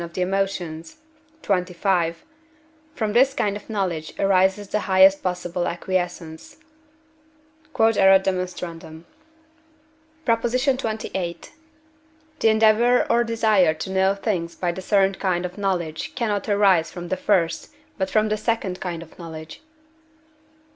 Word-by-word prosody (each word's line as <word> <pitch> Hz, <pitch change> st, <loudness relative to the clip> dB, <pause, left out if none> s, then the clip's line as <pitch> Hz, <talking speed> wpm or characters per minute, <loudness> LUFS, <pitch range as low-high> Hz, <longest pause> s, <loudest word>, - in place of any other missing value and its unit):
of 170 Hz, 0 st, -9 dB
the 185 Hz, -, -3 dB
Emotions, 180 Hz, -, -3 dB, 0.5 s
xxv.), 180 Hz, -2 st, 0 dB, 0.8 s
from 215 Hz, -2 st, -2 dB
this 265 Hz, +3 st, +4 dB
kind 205 Hz, -1 st, 0 dB
of 210 Hz, -, -10 dB
knowledge 180 Hz, -7 st, -3 dB
arises 195 Hz, +1 st, +2 dB
the 210 Hz, -, 0 dB
highest 190 Hz, +1 st, +6 dB
possible 180 Hz, -1 st, -2 dB
acquiescence. 175 Hz, -2 st, -4 dB, 1.2 s
Q.E.D. 225 Hz, -1 st, +3 dB, 2.3 s
PROP. 230 Hz, -1 st, +1 dB
XXVIII. 225 Hz, -, -2 dB, 1.0 s
The 225 Hz, -, +4 dB
endeavour 220 Hz, +3 st, +4 dB
or 235 Hz, +1 st, +3 dB
desire 215 Hz, -8 st, +2 dB
to 160 Hz, +5 st, -6 dB
know 190 Hz, +1 st, +2 dB
things 185 Hz, -5 st, -3 dB
by 175 Hz, -1 st, -1 dB
the 190 Hz, -, -7 dB
third 195 Hz, 0 st, +1 dB
kind 180 Hz, -2 st, 0 dB
of 180 Hz, +3 st, -7 dB
knowledge 175 Hz, -5 st, -3 dB
cannot 215 Hz, -4 st, -2 dB
arise 195 Hz, -5 st, +3 dB
from 175 Hz, -1 st, -8 dB
the 185 Hz, -, 0 dB
first, 170 Hz, -5 st, 0 dB, 0.3 s
but 190 Hz, 0 st, -1 dB
from 215 Hz, 0 st, +2 dB
the 215 Hz, -, 0 dB
second 215 Hz, -4 st, -2 dB
kind 170 Hz, -2 st, -4 dB
of 165 Hz, -, -19 dB
knowledge. 160 Hz, -, -9 dB
190 Hz, 120 wpm, -23 LUFS, 175-215 Hz, 2.3 s, highest